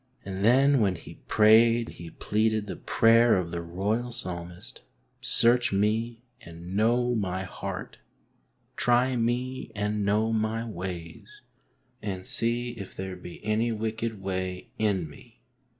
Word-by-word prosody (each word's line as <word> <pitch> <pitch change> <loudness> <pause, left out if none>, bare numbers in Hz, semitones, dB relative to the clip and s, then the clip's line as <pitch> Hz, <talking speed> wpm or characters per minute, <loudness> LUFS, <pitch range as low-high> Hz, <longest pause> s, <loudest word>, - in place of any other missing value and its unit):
And 95 0 -4
then 135 +5 +5
when 95 -3 +2
he - - -12
prayed 115 +2 +5
he 85 -1 -9
pleaded 110 +3 0
the 100 - -5
prayer 115 0 +4
of 85 -2 -2
the 85 - -3
royal 100 +8 -2
Psalmist, 90 -6 -7 0.3
" - - -44
Search 120 +1 +3
me 110 +4 0 0.2
and 85 +2 -9
know 120 +3 +2
my 95 -4 -1
heart, 95 - -6 0.8
try 125 +1 +3
me 120 +1 -2
and 105 0 -1
know 105 +3 +1
my 110 +1 -1
ways, 90 -5 -7 0.6
and 95 -3 -4
see 120 +1 -1
if 100 -6 -9
there 95 -1 -5
be 90 +2 -11
any 110 +2 +1
wicked 110 0 -3
way 95 -1 -4
in 100 -6 +1
me." 75 - -16
110 Hz, 135 wpm, -27 LUFS, 95-115 Hz, 0.8 s, then